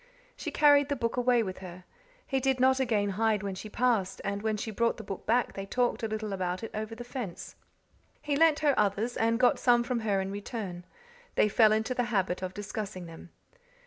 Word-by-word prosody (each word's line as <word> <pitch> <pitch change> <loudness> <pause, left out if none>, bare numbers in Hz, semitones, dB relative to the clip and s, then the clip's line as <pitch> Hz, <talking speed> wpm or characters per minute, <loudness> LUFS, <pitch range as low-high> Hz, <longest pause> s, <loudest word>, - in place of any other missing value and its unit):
She - - -5
carried 290 -1 +5
the 285 - +1
book 230 -3 -2
away 245 -1 +3
with 185 -3 -6
her. 185 -1 -10 0.4
He 270 - 0
did 265 0 +1
not 260 +1 +4
again 220 -6 +1
hide 215 0 +1
when 200 -1 -3
she 200 +3 -8
passed, 215 -5 0
and 200 +1 -2
when 215 0 -1
she 220 +2 -4
brought 230 +2 0
the 220 - -8
book 195 -2 -7
back 240 +3 +2
they 195 0 -6
talked 245 +3 0
a 225 - -1
little 215 -1 -4
about 185 +1 -2
it 225 - -5
over 215 +1 -4
the 240 - -7
fence. 240 -7 -7 0.6
He 290 -1 -2
lent 315 0 +4
her 295 -2 +4
others, 210 +4 0
and 230 +1 +1
got 250 - +4
some 240 -1 +4
from 245 -1 -1
her 205 -3 0
in 190 0 -3
return; 200 -3 -6 0.5
they - - +4
fell 215 +1 +5
into 220 +3 +1
the 245 -1 0
habit 195 -6 -1
of 185 0 -5
discussing 205 -3 -5
them. 165 +1 -11
220 Hz, 215 wpm, -29 LUFS, 195-245 Hz, 0.6 s, carried